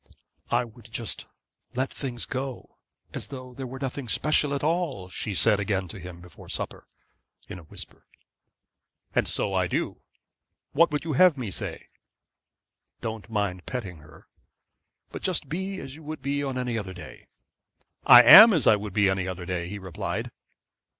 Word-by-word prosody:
'I - - +1
would 115 -1 -16
just 115 -4 -2 0.5
let 130 +2 -1
things 125 -4 -3
go, 130 0 -6 0.4
as - - -4
though 130 -2 -9
there 130 +1 -6
were 130 +2 -8
nothing 135 -1 -4
special 150 +1 +2
at 140 - -4
all,' 155 - -1
she 100 +2 -4
said 105 +2 +3
again 100 -2 -1
to 100 - -6
him, 90 -1 -10
before 90 -1 -14
supper, - - -5 0.6
in 90 - -8
a 85 - -15
whisper. - - -11 1.1
'And - - +1
so - - +1
I - - +1
do. - - -3 0.7
What 170 +4 +4
would 150 0 -2
you 160 -2 -3
have 170 +2 +5
me 120 -6 -4
say?' - - -5 1.1
'Don't 110 -1 -6
mind 100 -5 -2
petting 100 -9 -5
her, 75 -1 -17 0.9
but - - -7
just 180 -6 -2
be 190 +4 -3
as 135 - -8
you 155 - -12
would 155 -2 -8
be 140 +1 -1
any 125 -4 -2
other 95 -3 -7
day.' 90 - -12 0.8
'I 120 0 +11
am 205 - +11
as 155 -9 +1
I 110 - +6
would 105 -1 -7
be 105 -1 +3
any 95 -1 0
other 90 -1 -5
day,' 90 -1 -3
he 105 - -6
replied. 95 -4 -5
120 Hz, 170 wpm, -26 LUFS, 95-140 Hz, 1.1 s, I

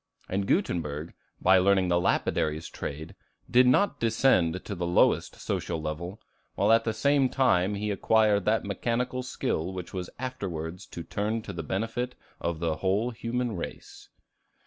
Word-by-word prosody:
And 95 +1 -1
Gutenberg, 80 - -1 0.3
by 95 +1 +5
learning 95 -1 +3
the 85 0 +3
lapidary's 80 -2 0
trade, 80 +3 -6 0.4
did 125 +1 +6
not 180 +11 +3
descend 110 -7 +2
to 105 - -4
the 90 -2 -3
lowest 85 - +3
social 85 -2 -3
level, 80 +6 -5 0.4
while - - +3
at 115 0 +4
the 115 - +1
same 140 +3 +3
time 105 -8 +2
he 105 +1 -2
acquired 105 0 +3
that 110 +1 +2
mechanical 120 +5 -1
skill 95 -8 -2
which 90 -2 -7
was 90 -1 -4
afterwards 90 -10 -5
to 85 - -7
turn 105 +6 -2
to 100 - -7
the 85 - -4
benefit 115 - -3 0.2
of 85 -1 -2
the 80 -1 -1
whole 100 +8 +1
human 120 0 -2
race. 85 - -8
100 Hz, 155 wpm, -28 LUFS, 85-115 Hz, 0.4 s, did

